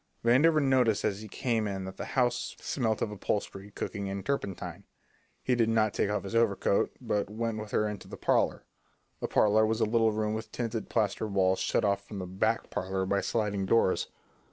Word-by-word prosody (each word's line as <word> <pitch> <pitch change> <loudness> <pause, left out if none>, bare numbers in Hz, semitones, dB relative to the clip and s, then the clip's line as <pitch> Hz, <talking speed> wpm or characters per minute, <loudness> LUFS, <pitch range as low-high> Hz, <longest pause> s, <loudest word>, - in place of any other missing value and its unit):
Vandover 150 +7 +5
noticed 130 -6 +3
as 105 -1 -1
he 110 - -8
came 115 -1 -1
in 95 -1 -4
that 95 - -8
the - - -4
house 125 -1 +1
smelt 115 -5 -1
of 105 - -2
upholstery, 100 -1 -3
cooking, 100 -1 -4
and 100 0 -5
turpentine. 120 -9 -3 0.6
He 130 - +1
did 115 -2 +2
not 110 -2 +2
take - - 0
off 105 - -1
his 100 - -6
overcoat, 110 -3 +2
but 100 -1 -1
went 110 0 -2
with 105 0 -6
her 105 0 +1
into 105 -2 -6
the - - -8
parlour. - - +1 0.5
The - - -2
parlour 110 +1 +4
was 110 +1 +1
a 110 - +3
little 110 0 +3
room 105 0 -1
with 110 0 -5
tinted 115 -2 -3
plaster 110 -1 0
walls 95 -2 +2
shut - - +1
off 100 0 0
from 105 - -7
the 95 - -4
"back 105 +5 -1
parlour" 95 0 -2
by 100 +1 +1
sliding 100 -4 -1
doors. 105 -3 +3
105 Hz, 200 wpm, -29 LUFS, 100-115 Hz, 0.6 s, Vandover